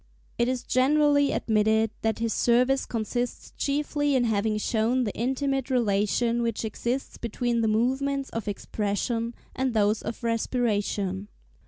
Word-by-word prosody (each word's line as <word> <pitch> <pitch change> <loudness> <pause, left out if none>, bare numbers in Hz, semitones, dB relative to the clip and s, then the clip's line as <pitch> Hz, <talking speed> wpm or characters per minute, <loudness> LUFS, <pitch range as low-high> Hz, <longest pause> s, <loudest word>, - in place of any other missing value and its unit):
It 235 - +3
is 255 -1 -1
generally 285 +2 +3
admitted 220 0 +2
that 220 0 0
his 230 -1 -1
service 250 +3 +2
consists 240 +2 -3
chiefly 290 0 0
in 255 - +3
having 215 -1 +1
shown 230 +4 +1
the 210 - -2
intimate 270 +2 -1
relation 235 0 +1
which 230 -1 -1
exists 240 +4 -3
between 235 +1 -1
the 220 - +2
movements 265 +5 0
of 225 -1 -4
expression 215 +3 -2 0.2
and 260 -2 -1
those 210 0 +2
of 235 - -6
respiration. 210 -4 -1
235 Hz, 135 wpm, -26 LUFS, 220-260 Hz, 0.2 s, It